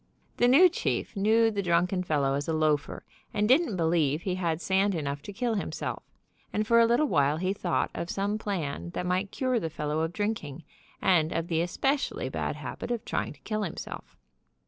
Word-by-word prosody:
The 245 - +4
new 290 +9 +8
chief 350 - -2
knew 220 +3 +3
the 205 -2 -1
drunken 180 +1 +1
fel 155 -5 0
low 135 0 +1
as 140 +1 -2
a 165 - 0
loafer, 155 -2 0 0.3
and 210 0 +2
didn't 260 - +3
believe 160 -3 +1
he 185 - -1
had 170 -3 -1
sand 190 +3 +1
enough 140 -3 -3
to 205 - -8
kill 235 +3 -1
himself, 205 - -3 0.5
and 215 +1 0
for 230 +1 +5
a 230 - +6
little 240 +6 +3
while 145 - +2
he 185 +3 0
thought 180 -3 -1
of 170 - -4
some 200 +2 -1
plan 150 - -3
that - - -2
might 185 +2 0
cure 255 0 0
the 165 - -3
fellow 150 0 -2
of 160 +1 -1
drinking, 175 -7 -3 0.4
and 170 -4 +3
of 165 +1 -2
the 165 -1 +1
especially 270 - -1
bad - - -2
habit - - -6
of 240 -2 -2
tryfng - - -2
to - - -26
kill 215 -1 -2
himself. 175 -6 -6
185 Hz, 200 wpm, -28 LUFS, 160-215 Hz, 0.5 s, new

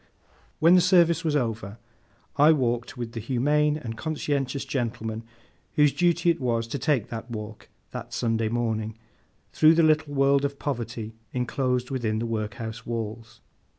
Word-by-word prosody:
When 165 +2 +5
the 180 - +7
service 170 -3 +4
was 155 -2 0
over, 115 -6 -2 0.6
I 150 +3 +6
walked 125 -1 -1
with 120 -2 -4
the 115 - -5
humane 145 +6 +1
and 115 -7 -6
conscientious 140 0 -2
gentleman 115 -3 -3 0.5
whose 150 -2 +4
duty 175 -1 +3
it 165 - -4
was 115 -2 0
to 140 - -3
take 140 -9 +1
that 115 +1 -6
walk, 110 -1 -7 0.2
that - - -7
Sunday 115 -2 0
morning, 110 -2 -2 0.6
through 155 +1 +6
the 165 - +4
little 155 -2 +2
world 140 0 +3
of 140 0 -2
poverty 115 -5 -4 0.2
enclosed 125 0 -1
within 115 -5 -1
the 115 - -2
workhouse 115 0 -4
walls. 115 0 -5
125 Hz, 150 wpm, -26 LUFS, 115-150 Hz, 0.6 s, the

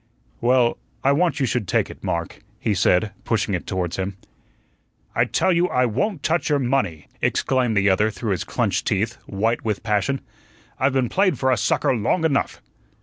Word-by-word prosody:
"Well, 120 0 +3 0.2
I 135 - +4
want 165 +1 +2
you 135 - +2
should 120 -5 -1
take - - +1
it, - - -14
Mark," 85 -1 -3 0.2
he 110 - 0
said, 90 +2 +2
pushing - - 0
it - - -3
towards 90 -3 -2
him. 95 0 -3 1.0
"I - - +3
tell 185 - +1
you 175 +1 +3
I 125 -7 +2
won't 145 - -1
touch 160 -2 +1
your 145 - +3
money," 125 - -1 0.2
exclaimed 125 -5 +1
the 100 0 +3
other 100 +3 +3
through 110 0 -4
his 90 - -1
clenched - - -1
teeth, - - 0
white 110 +4 -1
with 105 -4 -2
passion. 110 +6 0 0.6
"I've 135 +1 +2
been 130 -2 +2
played 185 - +2
for 130 +1 +1
a - - +4
sucker 110 +4 +1
long 125 - +1
enough." 140 -3 0
120 Hz, 185 wpm, -22 LUFS, 105-140 Hz, 1.0 s, I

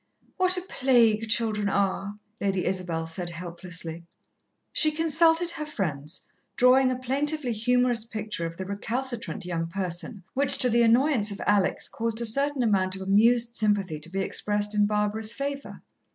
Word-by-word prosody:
"What 370 -1 +3
a - - -2
plague 235 - +2
children 215 -3 +1
are!" 200 +1 -1 0.2
Lady 195 -2 -1
Isabel 175 -3 -2
said 175 +2 -5
helplessly. 170 -1 -5 0.7
She 310 - +4
consulted 325 +2 +2
her 305 - -5
friends, 155 - -3 0.3
drawing 255 +1 +4
a 255 - -2
plaintively 275 +2 0
humorous 245 +1 +1
picture 215 -6 -5
of 165 0 -10
the 190 - -5
recalcitrant 225 +1 -4
young 165 -2 -3
person, 185 +3 -5
which, 275 +1 +2
to 250 -2 +2
the 235 +1 +3
annoyance 235 -1 +3
of 200 - -5
Alex, 205 -2 +2
caused 230 0 -2
a 235 - -1
certain 275 +3 +3
amount 190 -4 +1
of 190 - -7
amused 230 +4 +3
sympathy 200 -7 0
to 155 +3 -8
be 195 +2 -3
expressed 205 +2 0
in 210 0 +2
Barbara's 210 +2 0
favour. 280 0 -5
215 Hz, 155 wpm, -26 LUFS, 190-255 Hz, 0.7 s, She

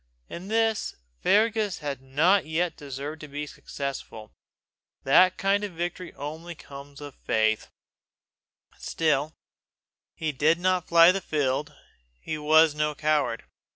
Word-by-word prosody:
In 180 +3 -8
this 225 0 0 0.3
Fergus 215 -1 +2
had 140 -3 -5
not 155 +8 +2
yet 165 +2 -1
deserved 145 +2 -7
to 155 - -8
be 145 +1 -5
successful. 135 -7 -7 0.7
That 185 +7 +5
kind 200 +1 +1
of 205 -3 -4
victory 175 +1 -4
comes - - -24
only 160 +4 -7 0.5
of 140 - -14
faith. 110 -1 +1 1.1
Still, 155 -1 0 0.8
he 155 -1 -2
did 150 +4 +2
not 185 0 +1
fly 170 +1 +7
the 195 +1 -2
field; 145 -3 -1 0.4
he 155 - -5
was 155 +1 +5
no 150 0 -1
coward. 150 -6 0
155 Hz, 125 wpm, -26 LUFS, 145-180 Hz, 1.1 s, fly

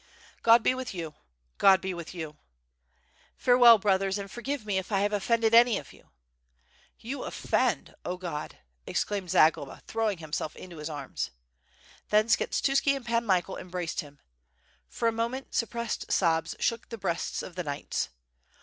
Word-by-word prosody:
"God 230 0 +6
be - - +4
with 255 -5 -5
you! 165 -3 -5 0.5
God 190 -1 +7
be 190 0 -3
with 170 -2 -7
you!'^ 160 -3 -6 1.0
"Farewell, 245 -2 +7
brothers, 195 -1 +1
and 200 -1 -7
forgive 255 0 -4
me 200 -3 0
if 190 - -8
I 195 -1 +2
have 205 +1 +1
offended 225 +2 +2
any 235 -2 +7
of - - -9
you." - - -20 0.9
"You 265 +5 -6
offend! - - 0
0 180 +1 -3
God!" 170 -5 -5 0.3
exclaimed 200 -3 -2
Zagloba, 160 0 +3
throwing 220 -3 -1
him 155 -2 -11
self 155 - -2
into 180 -3 -10
his 150 +1 -5
arms. 145 -3 -4 0.8
Then 215 +2 +3
Skshetuski 275 +3 +2
and 270 -3 -7
Pan 235 -1 0
Michael 185 -1 +1
embraced 180 -2 -4
him. 145 -1 -14 0.7
For 230 - -1
a - - +4
moment 235 +4 -3
suppressed 235 -1 -2
sobs 165 -2 +2
shook 230 0 -1
the 230 - -6
breasts 175 -4 -2
of 180 - -8
the 180 +1 -4
knights. 145 -3 -3
200 Hz, 160 wpm, -28 LUFS, 175-230 Hz, 1.0 s, God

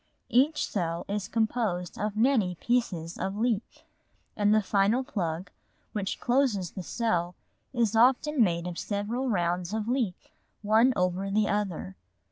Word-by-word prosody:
Each 285 +5 +3
cell 170 -4 -2
is 200 -1 -2
composed 220 -6 -1
of 210 0 -2
many 220 -7 +3
pieces 180 -7 -1
of 195 +1 -3
leaf, 225 -1 -1 0.5
and 205 -1 +2
the 215 0 +4
final 205 +6 +2
plug 180 -5 -3 0.4
which 200 -3 -3
closes 240 - +1
the 190 - -6
cell 180 -3 -1 0.4
is 230 -4 +1
often 255 +3 +4
made 170 -3 0
of 175 -1 -4
several 225 +6 -2
rounds 175 -1 0
of 220 -1 -2
leaf 240 -7 0 0.5
one 220 +5 +5
over 180 +1 0
the 205 +1 +2
other. 180 - -2
205 Hz, 140 wpm, -28 LUFS, 180-235 Hz, 0.5 s, one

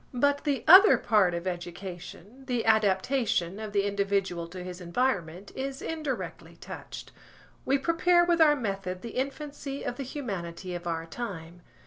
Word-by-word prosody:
But 285 +4 +1
the 285 -2 0
other 385 +5 +9
part 195 -5 +3
of 170 +1 -4
education, 180 +6 -7
the 245 -3 -1
adaptation 210 -2 +2
of 215 -1 -5
the 200 -1 +2
individual 200 -4 -1
to 180 +1 -8
his 180 0 -8
environment, 180 -2 -1
is 270 0 -4
indirectly 305 -5 -5
touched. - - -9 0.5
We 275 - +3
prepare 345 +4 +3
with 345 -1 +2
our 300 -2 +7
method 195 -7 -4
the 235 - -5
infancy 275 +1 -4
of 245 - -4
the 275 - -3
humanity 190 - -5
of 175 0 -6
our 165 -1 -2
time. 175 -4 -7
205 Hz, 150 wpm, -28 LUFS, 180-275 Hz, 0.5 s, other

